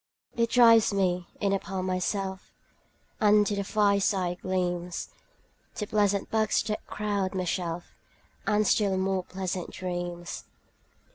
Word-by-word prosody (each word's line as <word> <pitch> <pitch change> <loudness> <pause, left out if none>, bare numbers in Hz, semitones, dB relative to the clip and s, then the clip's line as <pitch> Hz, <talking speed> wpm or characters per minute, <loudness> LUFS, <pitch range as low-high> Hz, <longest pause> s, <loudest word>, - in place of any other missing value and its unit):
It 230 -1 +1
drives 230 -3 +6
me 180 -3 0
in 200 -1 +1
upon 190 -1 -2
myself 190 +1 -2 0.7
5 215 - +3
And 210 0 +6
to 205 - -1
the 200 - -1
fireside 200 -3 +1
gleams, 180 -2 -2 0.7
To 210 - -3
pleasant 205 -2 +1
books 220 -1 +2
that 210 -1 -4
crowd 200 -3 -2
my 185 - 0
shelf, 170 -1 -3 0.5
And 215 0 +3
still 200 -2 +2
more 190 0 0
pleasant 185 -1 -4
dreams. 175 -1 -5
195 Hz, 130 wpm, -28 LUFS, 180-210 Hz, 0.7 s, drives